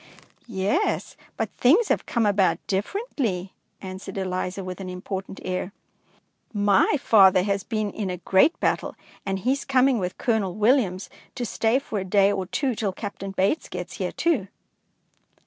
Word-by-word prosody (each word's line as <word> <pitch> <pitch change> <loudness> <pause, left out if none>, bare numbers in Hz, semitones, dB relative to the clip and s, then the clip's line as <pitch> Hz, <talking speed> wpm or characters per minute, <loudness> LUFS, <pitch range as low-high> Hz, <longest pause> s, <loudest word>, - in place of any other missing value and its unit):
"Yes, 230 - -1 0.2
but - - -2
things 355 - +4
have - - 0
come 235 -3 +1
about 200 -2 +3
differently," 200 - -2 0.3
answered 190 +1 -7
Eliza, 185 0 -2
with 185 +1 -6
an 185 - -5
important 190 +1 -6
air. 185 +1 -3 0.8
"My 205 +6 +3
father 190 -6 +6
has 200 -1 -1
been 215 -2 -2
in 205 -2 -4
a 180 - -3
great 190 - +3
battle, - - 0 0.3
and 195 0 0
he 235 +7 0
is 275 - -1
coming 260 -2 +3
with 180 -1 -3
Colonel 220 -7 0
Williams 210 -4 +2 0.3
to 245 - -3
stay 225 +2 +1
for 225 -6 -3
a - - -3
day 195 +1 +3
or 190 -2 -2
two 270 +4 0
till 210 -4 -2
Captain 200 -1 -6
Bates 195 +10 0
gets - - -6
here - - -2
too." 300 - 0
200 Hz, 160 wpm, -25 LUFS, 190-235 Hz, 0.8 s, father